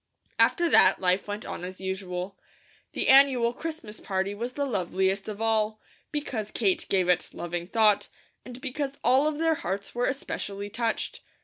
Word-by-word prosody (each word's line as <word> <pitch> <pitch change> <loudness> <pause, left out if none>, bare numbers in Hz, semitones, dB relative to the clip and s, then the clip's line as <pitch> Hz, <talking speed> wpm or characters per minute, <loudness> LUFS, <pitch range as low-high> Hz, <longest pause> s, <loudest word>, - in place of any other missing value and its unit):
After 345 -2 +4
that - - +6
life 185 +2 +1
went 205 +1 -5
on - - -6
as 185 +1 -6
usual. 190 0 -4 0.6
The - - -2
annual 260 -3 +6
Christmas 315 -7 -6
party 190 0 -2
was 235 +4 -4
the 285 +1 -1
loveliest 190 -3 -1
of 210 -1 -5
all, 220 -1 +1 0.3
because 260 -8 -3
Kate 200 -5 0
gave 185 -2 +2
it 180 -1 +2
loving 175 0 -4
thought, 215 0 +3 0.4
and 250 0 -9
because 275 +1 -3
all 260 +5 +4
of 305 -1 -1
their 325 0 +2
hearts 200 - -4
were 245 +1 0
especially 205 -6 -4
touched. 230 0 -2
215 Hz, 165 wpm, -27 LUFS, 190-260 Hz, 0.6 s, that